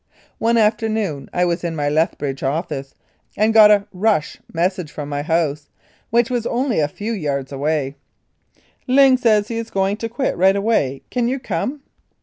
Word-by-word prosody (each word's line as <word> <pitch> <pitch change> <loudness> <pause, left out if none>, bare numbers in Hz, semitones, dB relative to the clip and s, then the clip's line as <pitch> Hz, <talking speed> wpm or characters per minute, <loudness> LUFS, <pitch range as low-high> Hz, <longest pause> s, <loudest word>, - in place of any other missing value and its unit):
One 230 +1 +2
afternoon 215 - 0
I 180 - +1
was 175 0 -1
in 170 -1 -2
my 145 -2 -1
Lethbridge 145 -3 -1
office 140 -1 -3 0.4
and 215 +1 +2
got 215 -1 +8
a 205 -1 +4
"rush" 190 -4 0
mes 175 +3 +1
sage 180 -5 -8
from 145 -1 -6
my 145 0 -2
house, 155 -2 -1 0.4
which 235 +2 +2
was 240 -2 -1
only 245 - 0
a 150 - +2
few 205 +9 -5
yards 140 -8 -3
away: 140 0 -1 0.5
" - - -37
Ling 265 0 +6
says 220 -5 +2
he 230 - -3
is 230 - -6
going 195 +1 0
to 230 +1 -4
quit, 250 +4 -1
right 190 +2 +4
away. 200 - 0
Can 245 -2 0
you 260 +2 -1
come?" 275 +2 -3
195 Hz, 180 wpm, -20 LUFS, 150-225 Hz, 0.5 s, got